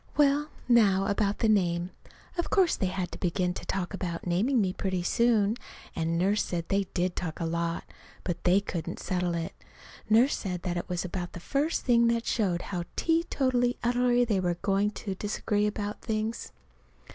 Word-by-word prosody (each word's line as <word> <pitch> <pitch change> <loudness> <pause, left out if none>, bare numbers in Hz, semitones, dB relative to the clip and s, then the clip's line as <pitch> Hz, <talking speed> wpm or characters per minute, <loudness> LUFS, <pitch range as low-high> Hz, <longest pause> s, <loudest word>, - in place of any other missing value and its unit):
Well, 295 +1 +3 0.2
now, 205 -6 +5
about 200 0 +1
the 225 - +1
name. 180 -4 +2 0.4
Of 345 - -2
course 375 -4 +3
they 190 - 0
had 180 -1 -3
to - - -8
begin 180 0 0
to - - -7
talk 190 0 -2
about 175 -3 -4
naming 210 +10 +2
me 190 -3 +1
pretty 185 -2 -2
soon; 225 +1 +2 0.4
and 165 0 0
Nurse 195 +4 +2
said 170 -2 -4
they 195 0 +2
did 180 0 0
talk 160 -4 -4
a 165 - -1
lot. 170 0 -1 0.4
But 175 -2 -3
they 185 +3 +4
couldn't 175 -3 -4
settle 180 -2 -1
it. 165 -1 -3 0.6
Nurse 235 +6 +5
said 180 -3 -4
that 180 -2 -1
that 175 - -4
was 180 0 -2
about 180 -1 -4
the - - -7
first 285 - -1
thing 235 -2 +5
that 235 0 +1
showed 185 -7 0
how 175 -1 -2
teetotally 260 -7 +1
utterly 245 0 +3
they 210 -5 +1
were 175 -2 0
going 200 +1 +2 0.2
to 195 - -1
disagree 205 +1 -1
about 210 0 -4
things. 220 0 -3
195 Hz, 180 wpm, -28 LUFS, 180-235 Hz, 0.6 s, now